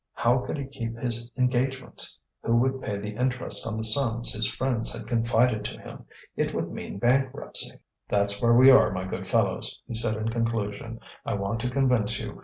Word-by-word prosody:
How 120 Hz, +2 st, +2 dB
could 125 Hz, -, -5 dB
he 140 Hz, -, -4 dB
keep 115 Hz, -4 st, -6 dB
his 120 Hz, 0 st, -1 dB
engagements? 125 Hz, 0 st, -1 dB, 0.2 s
Who 115 Hz, -, 0 dB
would 130 Hz, +2 st, +1 dB
pay 100 Hz, -, -4 dB
the 105 Hz, +1 st, -6 dB
interest 125 Hz, +1 st, -1 dB
on 110 Hz, -1 st, -4 dB
the 110 Hz, -, -3 dB
sums 120 Hz, 0 st, +5 dB
his 110 Hz, 0 st, +1 dB
friends 120 Hz, -3 st, -1 dB
had -, -, -7 dB
confided 115 Hz, -1 st, +1 dB
to -, -, -6 dB
him? -, -, -12 dB, 0.3 s
It -, -, -2 dB
would -, -, -3 dB
mean -, -, -7 dB
bankruptcy. 130 Hz, +4 st, +1 dB, 0.3 s
"That's 100 Hz, 0 st, +2 dB
where 115 Hz, 0 st, +4 dB
we 130 Hz, +2 st, +8 dB
are, 130 Hz, -4 st, +5 dB
my 90 Hz, 0 st, -4 dB
good 95 Hz, -, -6 dB
fellows," -, -, 0 dB
he -, -, -7 dB
said, 110 Hz, -1 st, +2 dB
in 110 Hz, +1 st, -3 dB
conclusion. 115 Hz, -1 st, -3 dB, 0.2 s
"I -, -, -3 dB
want 100 Hz, +3 st, -3 dB
to 125 Hz, -, -2 dB
convince 125 Hz, -5 st, +1 dB
you. -, -, -7 dB
115 Hz, 195 wpm, -26 LUFS, 110-125 Hz, 0.3 s, we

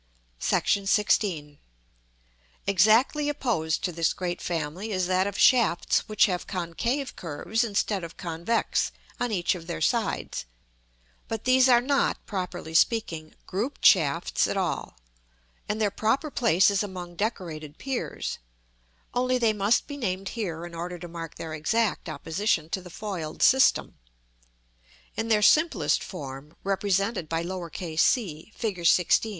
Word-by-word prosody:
§ -, -, -2 dB, 0.5 s
XVI. 165 Hz, -8 st, 0 dB, 1.1 s
Exactly 220 Hz, -, +4 dB
opposed 225 Hz, -, -1 dB
to 180 Hz, -, 0 dB
this 165 Hz, -1 st, +1 dB
great 175 Hz, -1 st, -4 dB
family 170 Hz, +5 st, -3 dB
is 185 Hz, -2 st, 0 dB
that 185 Hz, +1 st, +2 dB
of 200 Hz, -, -4 dB
shafts 230 Hz, -6 st, +3 dB
which 215 Hz, +2 st, +4 dB
have 180 Hz, -4 st, -2 dB
concave 205 Hz, -, -2 dB
curves 180 Hz, +8 st, -2 dB
instead 205 Hz, -3 st, -1 dB
of 165 Hz, 0 st, -8 dB
convex 175 Hz, +6 st, -1 dB, 0.3 s
on 245 Hz, -, -1 dB
each 180 Hz, -5 st, +1 dB
of 170 Hz, -3 st, -9 dB
their 80 Hz, -, -4 dB
sides; -, -, -1 dB, 0.8 s
but 225 Hz, -1 st, -4 dB
these 255 Hz, +1 st, +5 dB
are 240 Hz, -1 st, +6 dB
not, 275 Hz, +2 st, +1 dB
properly 180 Hz, -5 st, -5 dB
speaking, 165 Hz, -5 st, +1 dB
grouped 220 Hz, +10 st, -3 dB
shafts 160 Hz, -10 st, +4 dB
at -, -, -2 dB
all, -, -, -2 dB, 0.7 s
and 210 Hz, +1 st, -1 dB
their 210 Hz, -2 st, +1 dB
proper 240 Hz, +9 st, 0 dB
place 200 Hz, -6 st, +4 dB
is 200 Hz, -, +1 dB
among 180 Hz, -4 st, -6 dB
decorated 165 Hz, -8 st, -4 dB
piers; 265 Hz, -2 st, -4 dB, 0.7 s
only 255 Hz, +1 st, +1 dB
they 230 Hz, -3 st, +2 dB
must 210 Hz, +2 st, +2 dB
be 285 Hz, -, -7 dB
named 195 Hz, -6 st, -2 dB
here 175 Hz, -8 st, -4 dB
in 175 Hz, -, -10 dB
order 175 Hz, +1 st, -5 dB
to 175 Hz, 0 st, -8 dB
mark 165 Hz, -1 st, -7 dB
their 160 Hz, -1 st, -6 dB
exact 195 Hz, +5 st, 0 dB
opposition 160 Hz, +2 st, -1 dB
to 190 Hz, -, -2 dB
the 180 Hz, -, -11 dB
foiled 175 Hz, -5 st, -4 dB
system. 265 Hz, +1 st, +4 dB, 1.2 s
In 225 Hz, -, -2 dB
their 215 Hz, -2 st, +3 dB
simplest 210 Hz, -, +3 dB
form, 135 Hz, +1 st, -8 dB
represented 195 Hz, -2 st, 0 dB
by 165 Hz, 0 st, -1 dB, 0.5 s
c, 170 Hz, -1 st, +1 dB
Fig. 215 Hz, -5 st, -2 dB
XVI. 175 Hz, +5 st, +3 dB
190 Hz, 140 wpm, -26 LUFS, 165-225 Hz, 1.2 s, are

